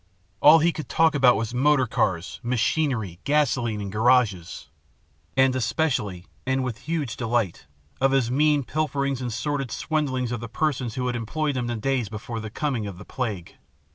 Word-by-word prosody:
All 150 +6 +8
he 165 +2 +3
could 155 - -7
talk 160 -1 +3
about 130 -4 +5
was 115 +2 -3
motor 135 +1 +3
cars, 95 -6 -1
machinery, 120 - 0
gasoline, 130 -7 +1
and 100 -1 -5
garages 110 -5 +1 0.7
and 130 -1 +4
especially, 115 - -1 0.2
and 130 0 0
with 125 -4 -4
huge 150 -8 -1
delight, 115 - -1 0.3
of 135 0 +4
his 130 -3 +2
mean 145 +1 +3
pilferings 140 -2 -1
and 125 -1 -3
sordid 135 +2 -2
swindlings 130 -4 -1
of 120 - -2
the 115 0 -7
persons 130 -4 -1
who 125 - -2
had 125 -1 -1
employed 145 +6 -2
him 125 -1 -1
in - - -4
the 120 - -2
days 125 -2 0
before 115 +2 -6
the 110 -1 -6
coming 125 -3 -2
of 95 -3 -7
the 105 - -11
plague. 110 -9 -5
125 Hz, 175 wpm, -25 LUFS, 110-145 Hz, 0.7 s, All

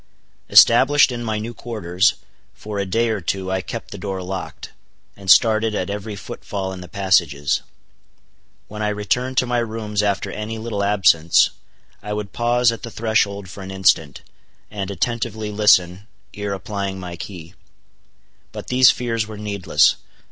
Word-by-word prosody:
Established 135 +4 +6
in 120 -1 -5
my 110 -2 -2
new 110 +3 -5
quarters, 105 -5 0 0.4
for 105 -1 -6
a 100 - -2
day 115 +5 +1
or 110 -3 -2
two 95 +2 -3
I 95 0 0
kept - - -7
the - - -8
door 95 -1 -4
locked, 95 0 -7 0.4
and 100 -1 -9
started 110 +1 +5
at 95 0 -2
every 105 +1 -5
footfall 95 -1 -6
in 90 - -8
the 90 - -10
passages. 85 -7 +1 1.1
When 105 +1 -8
I 105 - 0
returned 125 +5 -2
to - - +4
my 120 0 0
rooms 110 -2 -2
after 100 -1 -1
any 105 +2 -5
little 110 -3 -3
absence, 95 -5 +4 0.5
I 105 0 -5
would 105 -1 -5
pause 120 0 +2
at 115 - -7
the 120 - -7
threshold 110 -3 0
for 100 +2 -10
an 95 - -8
instant, 90 -7 +1 0.5
and 100 -2 -4
attentively 110 +1 -3
listen, 100 -2 +3 0.3
ere 105 -1 -4
applying 100 0 -4
my 90 -1 -7
key. 85 -2 -9 1.0
But - - -8
these 130 0 +6
fears 115 -3 -1
were 110 -1 -9
needless. 100 -3 +2
105 Hz, 160 wpm, -21 LUFS, 95-110 Hz, 1.1 s, Established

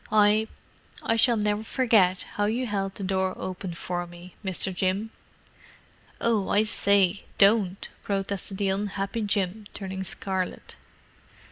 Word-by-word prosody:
"I—I 215 +1 0
shall 230 +1 +4
never 210 0 0
forget 220 -7 +3
how 205 - -2
you 235 +5 0
held 195 -3 -2
the 200 - -6
door 190 0 0
open 185 -1 -5
for 175 +1 -3
me, 175 +1 -13
Mr. 190 0 0
Jim!" 190 +4 -1 1.1
"Oh, 220 -4 +1
I 210 - +4
say, 200 -2 +4
don't!" 200 -2 +3
protested 195 -1 -2
the 200 -1 +1
unhappy 200 +2 -2
Jim, 205 0 -1
turning 190 -1 -5
scarlet. 190 0 -3
200 Hz, 125 wpm, -26 LUFS, 190-210 Hz, 1.1 s, shall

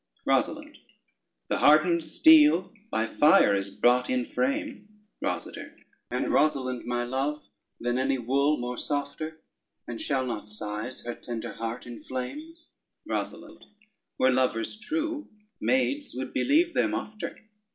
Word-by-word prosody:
ROSALYNDE - - 0 0.7
The - - -1
hardened 165 +3 +5
steel 295 - +5 0.2
by 110 - 0
fire 130 -3 +5
is 100 0 -1
brought 125 +5 +2
in 125 -1 0
frame: 275 - -2 0.3
ROSADER - - -4 0.3
And - - -1
Rosalynde, 130 -5 +1
my 120 0 -1
love, 135 +4 -3 0.3
than 120 +1 -1
any 135 +1 +1
wool 140 +5 +1
more 125 0 -4
softer; 155 +2 -3 0.5
And 120 - -5
shall 135 -2 0
not 110 -4 -4
sighs 105 +4 -3
her 120 - -3
tender 115 -2 -6
heart 115 +1 -5
inflame? 130 - -6 0.5
ROSALYNDE - - -5 0.5
Were 130 - +4
lovers 125 - +1
true, 310 +6 -3 0.3
maids 280 +2 0
would 130 +1 -5
believe 330 +5 +3
them - - +1
ofter. 215 0 -5
135 Hz, 125 wpm, -27 LUFS, -, 0.7 s, hardened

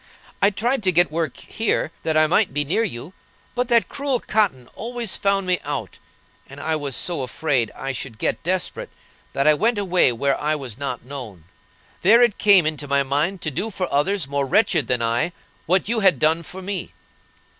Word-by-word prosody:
I 200 - +6
tried 235 +5 0
to 190 -3 +2
get 175 -1 +3
work 160 -3 -2
here, 220 -7 -2
that 160 -1 0
I 155 - +5
might 175 -1 +2
be 145 0 +1
near 180 +10 +1
you; 165 - -5 0.4
but 250 0 -1
that 235 -2 +3
cruel 275 -3 -1
Cotton 185 - 0
always 235 -2 -4
found 195 -1 +1
me 180 -1 +1
out; - - -4 0.5
and 135 +1 -11
I 160 +1 -1
was 145 -4 -3
so 170 -5 -1
afraid 130 -3 0
I 135 - -4
should 130 -3 -6
get - - -1
desperate 185 +2 -2 0.4
that 140 - 0
I 155 - +7
went 220 +9 +1
away 185 -8 +3
where 135 +4 0
I 155 +1 +1
was 130 -7 -6
not 125 -4 -4
known. 125 - -8 0.6
There 230 +6 +6
it 235 -4 +1
came 200 -5 +6
into 155 -2 -2
my 140 0 +2
mind 150 +7 -1
to 160 - -2
do 215 - -2
for 185 -3 -3
others 175 +3 +1
more 140 0 -1
wretched 205 +9 +2
than 125 -2 0
I 120 +9 0 0.3
what 185 +3 +2
you 230 +1 0
had 190 -8 +4
done 160 +4 +2
for 185 +3 -9
me. 195 -1 -5
165 Hz, 200 wpm, -22 LUFS, 140-200 Hz, 0.6 s, I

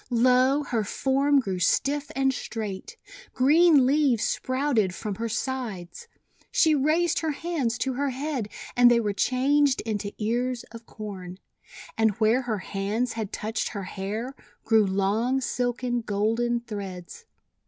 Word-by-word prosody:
Lo! 255 +4 +3
her 230 -6 -1
form 275 +6 +1
grew 190 -7 -3
stiff 280 - +1
and 270 0 +2
straight. 210 -6 -6 0.4
Green 300 +1 +5
leaves 270 -4 +2
sprouted 255 -8 0
from 210 -2 -4
her 230 +4 -4
sides. 240 - -4 0.4
She 320 -2 +4
raised 310 +4 +2
her 320 - -2
hands 285 -8 -2
to 260 +3 -1
her 280 +2 -1
head, 265 -4 -3 0.3
and 245 0 +7
they 240 -1 +4
were 210 -3 -1
changed 265 +5 +2
into 210 -2 -3
ears 240 +3 -1
of 230 -1 -11
Corn. 190 -4 -8 0.6
And 220 -1 +3
where 225 +4 +3
her 235 -4 -2
hands 205 +5 -2
had 220 -3 -4
touched 220 +1 -3
her 200 -2 -5
hair, 210 +7 -5 0.3
grew 220 -2 +3
long, 205 +7 +1
silken, 245 -1 -1
golden 230 +3 0
threads. 200 - -8
240 Hz, 140 wpm, -26 LUFS, 210-270 Hz, 0.6 s, and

